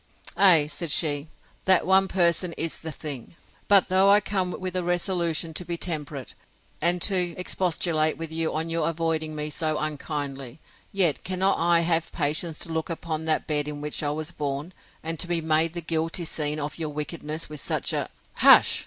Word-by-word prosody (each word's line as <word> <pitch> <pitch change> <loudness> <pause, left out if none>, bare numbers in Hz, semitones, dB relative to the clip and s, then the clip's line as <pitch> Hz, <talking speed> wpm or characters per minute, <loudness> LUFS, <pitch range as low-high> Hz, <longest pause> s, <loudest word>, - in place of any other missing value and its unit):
Ay, 175 -7 +7
said 160 +2 -4
she, 145 -1 +2 0.4
that 185 -3 +4
one 190 +1 +4
person 175 -1 +1
is 165 0 -2
the 160 - -6
thing!—But 155 - -1
though 190 +1 +4
I 205 +1 +7
came 195 -3 -1
with 185 0 -5
a 180 - 0
resolution 170 -2 -1
to 180 - -4
be 170 -1 -4
temperate, 150 -6 -4 0.5
and 175 +1 +4
to 180 -4 +2
expostulate 170 -3 0
with 165 0 -6
you 160 0 -1
on 160 +1 -2
your 165 -1 +1
avoiding 160 -1 -2
me 150 0 -4
so 155 0 -1
unkindly, 145 -3 -4 0.3
yet 180 -6 +2
cannot 190 +1 +1
I 170 0 +4
have 165 -1 +1
patience 155 +1 -1
to 165 - -6
look 160 0 -2
upon 160 -1 -4
that 160 -1 0
bed 150 -1 -1
in 150 -1 -5
which 150 0 -2
I 145 - -1
was 155 +2 -3
born, 145 +3 -4 0.3
and 165 0 -2
to 180 - 0
be 170 -1 0
made 160 0 +2
the 170 - -4
guilty 165 +2 -2
scene 150 -1 -2
of 150 +2 -5
your 160 -2 -2
wickedness 150 +2 -5
with 150 -1 -8
such - - -1
a—— - - -2 0.3
Hush! - - +7
165 Hz, 185 wpm, -25 LUFS, 150-175 Hz, 0.5 s, Ay